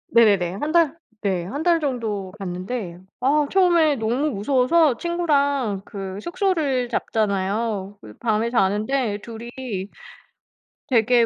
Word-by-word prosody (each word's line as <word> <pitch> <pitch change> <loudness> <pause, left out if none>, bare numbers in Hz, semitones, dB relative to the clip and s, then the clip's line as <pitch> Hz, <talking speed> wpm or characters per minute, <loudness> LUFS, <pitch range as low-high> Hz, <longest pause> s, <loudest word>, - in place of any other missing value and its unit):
네네네. 200 -6 +4
1 295 +10 -2
달 330 -2 +3 0.2
네. 190 -4 0
1 285 - -4
달 340 -1 +4
정도 220 -9 -2
갔는데 185 0 -5 0.2
아 290 +3 +3
처음에 345 -6 +4
너무 245 +7 0
무서워서 260 +5 +3
친구랑 285 - 0
그 195 -1 -6
숙소를 315 - 0
잡잖아요. 205 -2 -1
그리 105 - -12
밤에 225 0 +1
자는데 215 +1 +1
2 225 +1 -9 0.2
이 205 -7 -4 1.0
되게 240 -1 +4
235 Hz, 225 characters per minute, -23 LUFS, 200-285 Hz, 1.0 s, 네네네